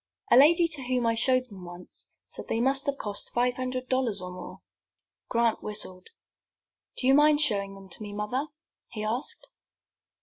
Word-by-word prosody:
"A - - +8
lady 330 +6 +6
to 300 -4 -4
whom 250 -1 0
I 230 - +3
showed 255 +2 +3
them 200 -7 -10
once 175 0 -11 0.2
said - - -9
they 225 - -1
must 270 +3 +1
have 280 -1 0
cost 205 -5 -4
five 245 +1 +1
hundred 255 0 -3
dollars 255 -5 0
or 180 0 -7
more." 180 - -10 0.7
Grant 230 -1 +1
whistled. 195 -3 -2 0.9
"Do - - -1
you 265 - +6
mind 295 +1 +5
showing 200 -9 +1
them 195 0 -13
to 185 - +1
me, 205 -1 -6
mother?" 210 +8 -2 0.4
he 215 -2 -6
asked. 230 +5 -3
240 Hz, 175 wpm, -27 LUFS, 205-265 Hz, 0.9 s, A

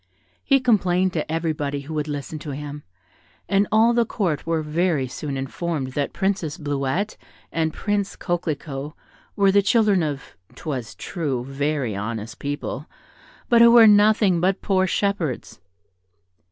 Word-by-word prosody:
He 275 -1 +4
complained 185 -7 +2
to 155 -1 -3
everybody 150 -3 -2
who 145 +3 -8
would 150 -1 -2
listen 145 +1 -5
to 150 - -8
him, 145 0 -7 0.7
and 200 0 +2
all 225 +2 +5
the 235 0 +3
Court 180 -10 -2
were 165 -1 0
very 155 -3 0
soon 140 +2 -5
informed 135 0 -3
that 140 +1 -2
Princess 190 -6 -1
Bleuette 145 +7 -2 0.3
and 160 -1 0
Prince 205 +3 -2
Coquelicot 150 -5 -3 0.4
were 200 -1 +4
the 200 +1 +5
children 205 -2 +3
of, 145 -4 -4 0.2
'twas 130 -8 -5
true, 135 -8 -3
very 135 -4 -2
honest 110 +2 -5
people, 145 0 -4 0.6
but 235 -1 +5
who 235 - +9
were 235 -1 +8
nothing 205 -4 +5
but 185 +2 +1
poor 190 -1 +2
shepherds. 185 - -2
160 Hz, 140 wpm, -23 LUFS, 145-195 Hz, 0.7 s, who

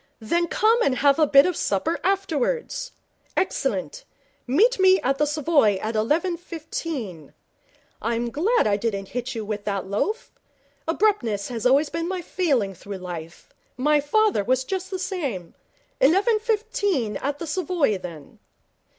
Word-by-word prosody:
'Then 340 +10 0
come 450 +7 +3
and 270 - +2
have 280 +3 +3
a 310 - +5
bit 275 0 +7
of 365 -2 0
supper 255 - -1
afterwards. 390 - -1 0.5
Excellent. - - -1 0.4
Meet 405 - +3
me 375 0 +6
at 270 +2 0
the 300 - +3
Savoy 295 -8 +3
at 220 +3 -4
eleven 315 - +1
fifteen. 310 - -6 0.7
I'm 235 +1 -1
glad 405 - +2
I 205 -1 +2
didn't 200 -3 -3
hit 245 +1 -4
you 220 -2 -4
with 210 -1 -4
that 200 -2 -2
loaf. 210 - -2 0.6
Abruptness 295 - +1
has 235 -1 0 0.2
been 330 0 -2
my 370 -1 -3
failing 275 - 0
through 200 +2 -8
life. 175 -2 -9 0.2
My 295 +3 +3
father 400 - +2
was 255 +3 +1
just 375 +5 -4
the 380 - -3
same. 280 - -4 0.5
Eleven 395 - +4
fifteen 410 - -1
at 285 +1 -3
the 335 - -5
Savoy, 320 - 0
then.' 165 -5 -10
290 Hz, 145 wpm, -24 LUFS, -, 0.7 s, bit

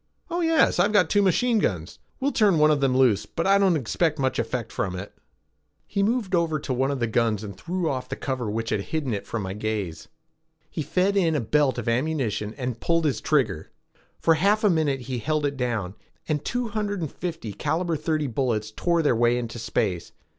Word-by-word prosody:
"Oh 345 +1 0
yes, 325 -1 +3
I've 210 - +3
got 185 -6 +4
two 205 - +4
machine 220 +5 +3
guns. 90 - -2 0.2
We'll 275 +2 +1
turn 205 - +3
one 155 0 +5
of 145 -2 +1
them 130 -2 +2
loose, 120 -7 +3
but - - -3
I 195 +1 +5
don't 190 -3 +4
expect 155 +5 0
much 130 -2 0
effect 115 0 -3
from 95 -2 -2
it." 95 +3 -7 0.7
He 200 - -2
moved 215 -1 0
over 165 -3 +2
to 140 - -3
one 130 +2 +1
of 140 -2 -2
the 120 - +1
guns 115 -2 0
and 100 -2 -7
threw 175 - -3
off 130 -4 -3
the - - -3
cover 130 -5 -3
which 115 +2 -3
had 100 - +1
hidden 140 +1 -2
it 100 - -4
from 115 -3 -3
my 95 0 -4
gaze. 105 -5 -4 0.6
He 160 - -3
fed 185 +6 +1
in 170 -5 +2
a - - +2
belt 130 +2 +1
of 120 -1 -4
ammunition 115 -5 -1
and 125 -3 -4
pulled 165 -1 +1
his 145 - 0
trigger. 125 - 0 0.5
For 165 - +4
half 200 +7 +2
a 210 - +5
minute 150 -5 +1
he 125 0 -4
held 155 +3 0
it 140 0 -1
down, 115 -8 -2 0.3
and 150 -2 -1
two 245 -1 -2
hundred 205 -3 -2
and 155 - -3
fifty 165 - -5
caliber 170 - -1
thirty 155 0 -1
bullets 115 -4 -1
tore 170 +7 +1
their 145 - +3
way 120 +1 +3
into 120 -1 -5
space. 95 -5 -2
140 Hz, 215 wpm, -25 LUFS, 115-170 Hz, 0.7 s, one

